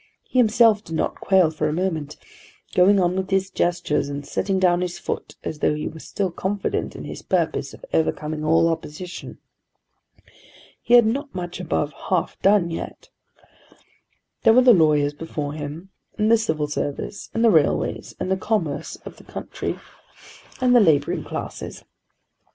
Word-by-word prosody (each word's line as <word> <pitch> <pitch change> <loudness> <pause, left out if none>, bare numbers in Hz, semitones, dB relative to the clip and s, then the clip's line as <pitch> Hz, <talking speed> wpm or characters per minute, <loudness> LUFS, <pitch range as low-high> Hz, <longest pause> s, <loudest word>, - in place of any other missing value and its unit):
He 255 - -1
himself 225 -2 +5
did 165 - -6
not - - 0
quail 185 -5 +3
for 155 -1 -1
a - - -2
moment, 160 -4 -2 0.6
going 195 +2 +5
on 180 0 +2
with 190 0 -2
his 195 0 0
gestures, 175 -6 0
and 140 0 -5
setting 195 0 -1
down 180 -1 +3
his 180 -1 -3
foot - - -5
as 155 - -5
though 150 - +2
he 150 - -3
were 160 - -8
still 190 +3 -3
confident 195 +3 -2
in - - -7
his - - -7
purpose - - -1
of - - -12
overcoming 155 -1 -1
all 165 +2 +4
opposition. 165 +2 -5 1.4
He 240 - +4
had 240 -2 +7
not 275 +3 -2
much 175 0 -5
above 155 -4 -1 0.2
half 180 -3 0
done 195 -4 +4
yet. 165 - -7 1.3
There 225 - +6
were 255 +2 +6
the 245 -1 +8
lawyers 150 -5 +3
before 145 -1 -5
him, 155 +5 -7 0.3
and 215 +1 +2
the 230 - +7
Civil 155 -9 -1
Service, 145 +6 -4
and 225 +1 +3
the 225 - +6
railways, 155 -5 +1
and 185 - -2
the 190 - +2
commerce 170 -9 -2
of - - -9
the - - -15
country, - - -5 0.8
and 250 -1 +4
the - - +8
labouring 155 -9 +2
classes. - - -6
175 Hz, 165 wpm, -23 LUFS, 155-200 Hz, 1.4 s, the